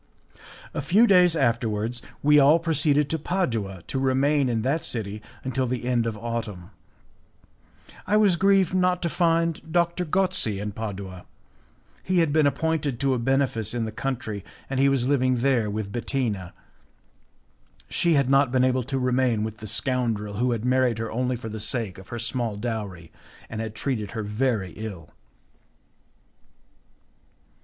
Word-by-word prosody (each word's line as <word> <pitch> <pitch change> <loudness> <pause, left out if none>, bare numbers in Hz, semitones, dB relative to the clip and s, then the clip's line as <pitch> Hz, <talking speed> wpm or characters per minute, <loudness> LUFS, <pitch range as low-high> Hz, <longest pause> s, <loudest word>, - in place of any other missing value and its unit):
A - - -2
few 215 +6 +4
days 180 -5 +5
afterwards 115 -3 0 0.2
we 150 +1 +6
all 145 +3 +6
proceeded 150 -3 +1
to 160 - 0
Padua 115 - -2
to 135 - -3
remain 135 +1 +2
in 115 -2 -1
that 145 +6 0
city 105 -2 -3 0.2
until 130 0 -1
the 125 0 -3
end 120 -2 +1
of 110 -2 -3
autumn. 110 -5 -5 1.4
I 210 +3 +3
was 205 -4 +4
grieved 195 0 +3
not 180 -1 +1
to 170 - +1
find 165 -1 +1
Doctor 170 +1 +1
Gozzi 180 - +1
in 105 +1 -4
Padua; 100 -4 -6 0.8
he 185 0 -1
had 165 -4 +3
been 155 -2 +4
appointed 150 -4 -1
to 135 -1 +2
a 125 - -1
benefice 120 -3 0
in 115 -2 -1
the 110 - -4
country, 110 -5 -4 0.3
and 135 - -1
he 140 +1 +5
was 130 -2 +1
living 130 -3 +2
there 125 -5 +2
with 105 -1 -4
Bettina; 110 -6 -2 1.3
she 170 - +1
had 140 -3 +3
not 135 -1 +3
been 130 -1 +3
able 130 0 +2
to 135 +1 -2
remain 125 -3 +1
with 110 0 -5
the 110 - -8
scoundrel 110 -3 0
who 125 +2 +1
had 115 -1 -2
married 125 -2 +2
her 115 0 -4
only 125 +2 -1
for 115 -1 -7
the 110 0 -6
sake 110 -3 -2
of 95 - -13
her 120 - -6
small 115 -2 -2
dowry, 105 -7 -5 0.4
and 110 - -3
had 110 -1 -5
treated 110 -5 -2
her 110 - -2
very 105 -3 -1
ill. 100 -7 -8
125 Hz, 160 wpm, -25 LUFS, 110-145 Hz, 1.4 s, we